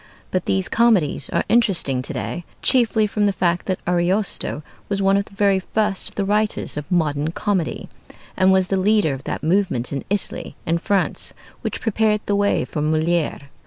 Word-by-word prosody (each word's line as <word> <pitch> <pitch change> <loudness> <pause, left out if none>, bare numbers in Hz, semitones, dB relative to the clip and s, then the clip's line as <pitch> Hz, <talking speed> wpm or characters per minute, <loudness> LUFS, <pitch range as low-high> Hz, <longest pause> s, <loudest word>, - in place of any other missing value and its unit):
But 185 -1 -1
these 190 -1 +2
comedies 220 -10 +2
are - - 0
interesting 190 - +2
to - - -7
day 175 - -4 0.2
chiefly 235 -4 +4
from 210 0 0
the - - +3
fact 175 -2 0
that 185 -2 -1
Ariosto 175 -2 0 0.3
was 200 -1 -1
one 195 0 +3
of 200 0 +1
the 200 - -18
very 200 -1 +3
first 210 +1 -1
of - - -24
the 200 - -1
writers 210 +1 0
of 150 +3 -6
modern 155 -3 +1
comedy, 185 -1 -2 0.5
and 185 0 +4
was 190 0 +3
the 195 - +1
leader 200 -5 +2
of 135 0 -8
that - - -4
movement 160 -8 0
in 140 - -3
Italy 205 0 -3
and 165 +1 0
France 200 -2 0 0.3
which - - -4
prepared 215 -1 +1
the 205 - 0
way 205 0 +1
for 150 - -4
Molière. 160 +2 0
190 Hz, 185 wpm, -21 LUFS, 170-205 Hz, 0.5 s, chiefly